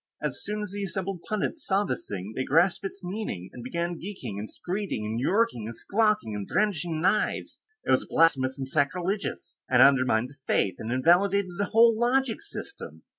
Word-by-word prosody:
As - - -3
soon 210 0 -3
as 205 - -6
the 200 0 -4
assembled 190 -1 -3
pundits 215 +9 -2
saw 195 +1 +2
this - - -4
thing 100 +2 -5
and 130 - -2
grasped 170 +7 +3
its 195 0 -6
meaning, 175 - -5
they 125 - -8
began 170 +7 -3
geeking 135 - -6
and 105 - -6
skreeking 185 - -3
and 110 +2 -2
yorking 185 - +1
and 115 - -6
squawking 210 - +1
and 100 -1 -5
brandishing 175 -6 0
knives 190 +5 0 0.2
it - - +1
was - - +3
blasphemous, 135 -5 +3
and 135 -1 -4
sacrilegious, 175 +8 -1
and 125 0 +7
undermined 130 -4 +4
the 140 - -18
Faith, 95 - +1
and 110 - -4
invalidated 180 +8 +3
the 205 - +2
whole 230 +3 +5
logic 245 +1 +1
system. 405 0 -8
175 Hz, 180 wpm, -27 LUFS, 130-205 Hz, 0.2 s, and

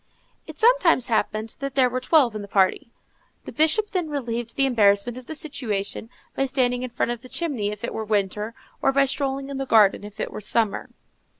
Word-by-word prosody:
It - - -10
sometimes 410 - +4
happened 220 0 -1
that 275 -1 -5
there 260 -2 +4
were 250 +1 -2
twelve 255 -3 +3
in 215 - -4
the 200 - -8
party; 195 +3 +1 0.6
the - - -7
Bishop 320 +8 +2
then 360 -5 -1
relieved 240 -5 -4
the 275 - +3
embarrassment 215 -2 +2
of 255 -1 -10
the 315 - -5
situation 225 -9 -3 0.3
by 270 - 0
standing 250 -2 0
in 255 - -4
front 240 0 -1
of 240 -1 -5
the 255 - -13
chimney 270 -12 -1
if 210 +2 -7
it 235 - -3
was 220 -1 -5
winter, 210 +2 -1 0.3
or 270 - +3
by 275 0 +3
strolling 275 0 -2
in 280 - -5
the 270 0 -3
garden 210 -4 +4
if 205 0 -11
it - - -3
was 210 - -2
summer. 220 -3 0
245 Hz, 210 wpm, -24 LUFS, 215-275 Hz, 0.6 s, sometimes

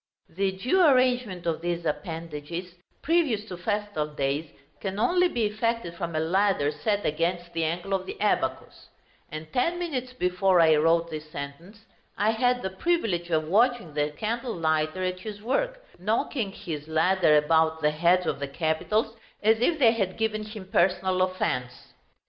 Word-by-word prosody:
The 190 +2 -1
due 255 - +2
arrangement 250 - +3
of 165 -1 -1
these 170 0 -2
appendages, 165 +1 -5 0.3
previous 295 -11 +1
to 185 - -7
festal 205 -4 -2
days, 145 +1 -2 0.3
can 195 -1 -4
only 360 +10 +3
be 235 -10 -1
effected 215 -3 -1
from 170 -2 -5
a - - +1
ladder 175 -2 +2
set 205 +6 -1
against 170 +3 -1
the 165 0 -1
angle 175 +4 -2
of 190 -1 -1
the - - -7
abacus; 130 -11 -1 0.4
and 155 0 -8
ten 335 +8 +1
minutes 265 -8 -3
before 180 -4 +2
I 160 -2 +6
wrote 165 +2 +2
this 155 0 -6
sentence, 165 +10 -9 0.3
I 210 +2 +3
had 245 +2 +1
the 190 - -2
privilege 190 - 0
of 155 -2 0
watching 225 -2 +2
the 150 0 0
candlelighter 175 - -1
at 185 0 -4
his 205 +1 -7
work, - - -2
knocking 215 - -1
his 155 -6 -6
ladder 160 0 +3
about 160 +1 +2
the 150 - +4
heads 175 +4 +3
of - - -1
the 140 - -3
capitals 165 +9 -1 0.3
as 220 +1 +4
if 315 +7 +2
they 245 -6 +6
had 195 -5 -2
given 215 -1 -1
him 210 -3 -9
personal 185 +1 +2
offence. 125 -9 -2
185 Hz, 160 wpm, -26 LUFS, 160-220 Hz, 0.4 s, I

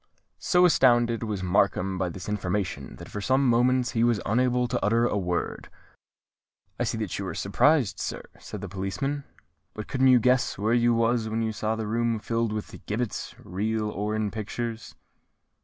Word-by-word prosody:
So 180 -1 +4
astounded 120 -7 +4
was 105 -4 -3
Markham 95 0 +1
by 90 - 0
this 90 +1 -8
information, 95 -7 -3
that - - -11
for 105 - -6
some 130 +5 +2
moments 125 +1 +3
he 115 - +1
was 120 -3 +3
unable 125 +2 +2
to - - -2
utter 115 +3 +3
a 120 - 0
word. 90 -3 -2 1.1
"I - - +1
see - - -2
that 105 -4 -3
you 100 - -3
are 85 - -5
surprised, 125 - +2
sir," - - -4 0.2
said 105 - -8
the 100 - -5
policeman; 100 +10 -3 0.5
"but 110 - -6
couldn't 130 0 +2
you 130 -1 +7
guess 125 +2 +2
where 110 +4 +1
you 120 0 +3
was 115 -1 +1
when 115 +1 -1
you 110 - -1
saw 110 +1 -2
the 110 -1 -4
room 115 +1 0
filled 115 +1 -1
with 105 -1 -6
gibbets, 110 +2 -3
real 105 +3 -2
or 105 +2 -2
in 110 -2 -1
pictures?" 115 +1 -5
110 Hz, 180 wpm, -26 LUFS, 100-120 Hz, 1.1 s, you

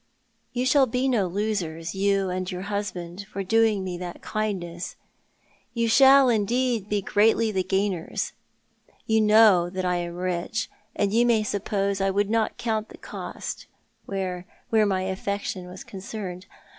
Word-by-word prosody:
You 250 +1 -1
shall 265 +1 +5
be 250 +3 0
no 225 -8 +2
losers, 175 -4 -2
you 195 -1 +1
and 185 0 -3
your 180 0 -5
husband, 200 -2 -4
for 195 - -3
doinpc 220 0 +3
me 180 -2 -4
that 175 -1 -7
kindness. 185 -5 -3 0.8
You 230 0 +1
shall, 270 +3 +7
indeed, 235 -1 +1
be 205 -2 0
greatly 220 +2 +3
the 190 -2 0
gainers. 190 -3 -1 0.7
You 220 0 +3
know 210 -5 +6
that 185 0 -3
I 180 0 +1
am 175 0 -4
rich, 180 +4 -2 0.2
and 205 0 0
you 235 +2 +5
may 225 -3 +3
suppose 200 -1 -1
I 195 - +2
would 200 +2 0
not 225 -1 +1
count 220 -2 -2
the - - -12
cost - - -7 0.4
where 185 -2 -3
— - - -24
wbere 215 -1 +5
my 190 -2 0
affection 190 -1 -3
was 180 +1 -9
concerned. 190 -2 -7
200 Hz, 155 wpm, -25 LUFS, 185-220 Hz, 0.8 s, shall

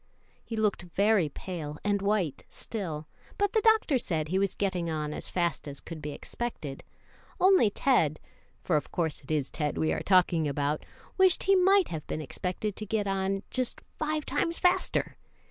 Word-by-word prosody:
He 225 - -5
looked 210 -4 +1
very 190 0 +2
pale 150 -2 -6
and 205 -1 +1
white 200 -8 0
still, 160 -9 -4 0.3
but 405 0 +1
the 440 - +3
doctor 435 - +4
said 160 -7 -2
he 190 +2 +1
was 195 -1 0
getting 185 -4 -1
on 150 -1 -2
as - - -6
fast 170 -5 -1
as 140 -1 -7
could 165 -2 -8
be 150 - -4
expected, 145 -2 -5 0.6
only 375 - +6
Ted 185 - +2 0.4
for 165 - +2
of 145 - -4
course 160 -3 -1
it 135 - -18
is 150 -4 0
Ted 150 -2 -2
we 160 - +1
are - - -2
talking 175 -4 +3
about 145 +1 -1 0.4
wished 375 -2 +5
he 390 0 +5
might 385 0 +5
have 160 -3 -5
been - - -3
expected 185 - -3
to 215 - -4
get 210 0 0
on 195 0 -1
just 255 -2 -2 0.2
five 310 -1 -1
times 335 0 0
faster. 360 0 +1
190 Hz, 180 wpm, -29 LUFS, 155-230 Hz, 0.6 s, only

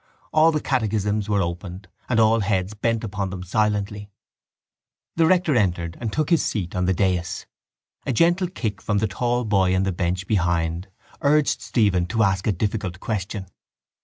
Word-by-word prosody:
All 160 +1 +5
the 155 - 0
catechisms 105 -4 0
were 100 -2 +2
opened 90 +2 -6 0.2
and 120 -3 +2
all 110 +1 +4
heads 95 -1 0
bent 115 +1 -1
upon 100 -2 -3
them 90 -1 -6
silently. 105 +1 -1 1.1
The 165 -1 +4
rector 175 -4 +3
entered 85 -6 0
and 115 -3 -2
took 155 +4 -1
his 165 - +4
seat 95 -3 -3
on 90 0 0
the 95 - +2
dais. 90 -3 -1 0.6
A - - +2
gentle 175 - +3
kick 110 - -4
from 105 - 0
the 110 +2 +1
tall 120 +4 -1
boy 95 -3 +2
in 95 - +2
the 95 - 0
bench 90 +1 -2
behind 85 -2 0 0.3
urged 150 0 +2
Stephen 95 -7 +1
to 110 +5 +1
ask 95 -2 +1
a - - +4
difficult 100 -1 -2
question. 100 -2 -3
105 Hz, 170 wpm, -23 LUFS, 95-115 Hz, 1.1 s, All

